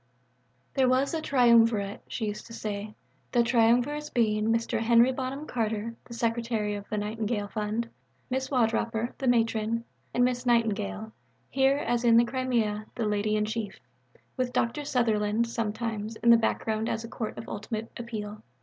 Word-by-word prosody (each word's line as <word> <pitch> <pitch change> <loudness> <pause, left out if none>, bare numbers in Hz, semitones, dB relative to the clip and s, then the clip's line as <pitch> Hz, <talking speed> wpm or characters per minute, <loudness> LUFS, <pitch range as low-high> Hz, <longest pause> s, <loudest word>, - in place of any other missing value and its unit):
There 260 -2 +3
was 260 +4 +2
a 320 - -1
Triumvirate, 230 -7 +3
she 225 - -3
used 210 0 -5
to 230 - -11
say; 210 -1 -5 0.4
the 240 -1 +4
Triumvirs 245 +5 +2
being 215 -3 +1
Mr. 230 0 +1
Henry 235 +2 +5
Bonham 265 +3 -4
Carter 225 -3 -2
(the 235 - -9
Secretary 230 -3 -1
of 205 0 -7
the 210 - -2
Nightingale 210 0 -2
Fund), 215 +2 -2 0.4
Mrs. 260 +1 -1
Wardroper 230 -2 0
(the 265 - -2
Matron) 230 -1 +1 0.3
and 245 - +3
Miss 250 0 -1
Nightingale 200 - 0 0.4
(here, 270 +1 +3
as 240 -4 -1
in 230 -1 +6
the 235 - +6
Crimea, 235 -5 -1
the 230 - -1
Lady 210 0 0
in 210 0 +1
Chief) 220 -2 -4 0.6
with 255 -1 0
Dr. 255 +4 0
Sutherland, 225 -3 +1
sometimes, 225 -1 -3
in 235 +1 +4
the - - +9
background 220 -1 -1
as 225 0 -2
a - - -6
court 225 -1 -5
of - - -7
ultimate 215 +2 -5
appeal. 215 -3 -6
230 Hz, 160 wpm, -28 LUFS, 215-240 Hz, 0.6 s, the